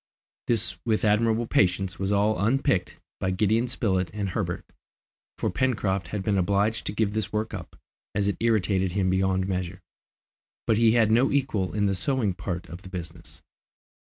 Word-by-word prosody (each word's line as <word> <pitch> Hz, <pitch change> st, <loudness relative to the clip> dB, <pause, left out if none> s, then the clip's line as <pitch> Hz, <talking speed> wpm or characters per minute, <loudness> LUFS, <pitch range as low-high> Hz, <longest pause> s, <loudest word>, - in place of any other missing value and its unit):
This 115 Hz, -1 st, 0 dB
with 110 Hz, -1 st, +1 dB
admirable 110 Hz, +2 st, +2 dB
patience 95 Hz, -3 st, +1 dB
was 95 Hz, +1 st, -1 dB
all 105 Hz, +1 st, +2 dB
unpicked 130 Hz, -3 st, +1 dB, 0.2 s
by 95 Hz, -, 0 dB
Gideon 110 Hz, +5 st, +2 dB
Spilett 95 Hz, -7 st, 0 dB
and 100 Hz, -2 st, -2 dB
Herbert, -, -, -3 dB, 0.7 s
for -, -, -1 dB
Pencroft 105 Hz, -7 st, 0 dB
had 105 Hz, -3 st, -4 dB
been 100 Hz, -2 st, +1 dB
obliged 100 Hz, +4 st, +1 dB
to -, -, 0 dB
give 105 Hz, -1 st, 0 dB
this 110 Hz, -2 st, -2 dB
work 110 Hz, +1 st, -2 dB
up, 90 Hz, -5 st, -7 dB, 0.4 s
as 100 Hz, 0 st, +1 dB
it 100 Hz, -4 st, 0 dB
irritated 95 Hz, -5 st, +1 dB
him 95 Hz, -2 st, +1 dB
beyond 95 Hz, 0 st, +1 dB
measure; 90 Hz, -1 st, -3 dB, 0.8 s
but 110 Hz, -, +2 dB
he 115 Hz, -1 st, +5 dB
had 115 Hz, -2 st, +4 dB
no 120 Hz, +4 st, +4 dB
equal 130 Hz, -9 st, 0 dB
in 105 Hz, -1 st, +2 dB
the 100 Hz, -, +2 dB
sewing 105 Hz, +2 st, 0 dB
part 90 Hz, -1 st, -5 dB
of 85 Hz, +1 st, -9 dB
the 95 Hz, -, -11 dB
business. 85 Hz, -3 st, -9 dB
100 Hz, 170 wpm, -26 LUFS, 95-110 Hz, 0.8 s, he